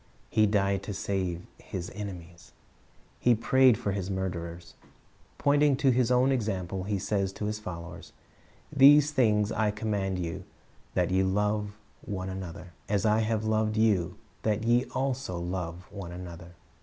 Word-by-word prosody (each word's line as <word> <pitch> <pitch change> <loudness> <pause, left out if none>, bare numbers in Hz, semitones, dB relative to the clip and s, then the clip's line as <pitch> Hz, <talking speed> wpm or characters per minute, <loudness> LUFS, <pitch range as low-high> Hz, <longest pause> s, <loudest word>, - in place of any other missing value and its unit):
He 110 -1 +4
died 100 -1 +1
to 100 0 -6
save 90 -3 -2
His 90 -1 -6
enemies. 90 -5 -8 0.7
He 120 -1 +4
prayed 125 +1 +4
for 100 - -2
His 95 -1 -3
murderers. 85 -3 -4 0.6
Pointing 145 0 +3
to 135 0 +3
His 125 -1 +2
own 125 +2 +4
example. 95 -6 -2
He 105 0 -1
says 100 0 -1
to 105 - -5
His 105 0 -2
followers, 85 -5 -8 0.6
"These 145 +2 +7
things 105 -6 +2
I 110 -1 +1
command 105 -3 -2
you, 85 -3 -4 0.5
that 90 -1 +1
ye 95 +1 +3
love 105 +2 0 0.3
one 95 -2 -4
another;" 90 -2 -7 0.2
"as 105 +1 +1
I 110 0 +4
have 110 0 0
loved 110 0 +1
you, 105 -6 +2 0.2
that 110 0 0
ye 120 +2 +3
also 130 -7 -2
love 90 0 -4
one 95 -4 -7
another."' 90 -1 -9
100 Hz, 150 wpm, -28 LUFS, 90-110 Hz, 0.7 s, These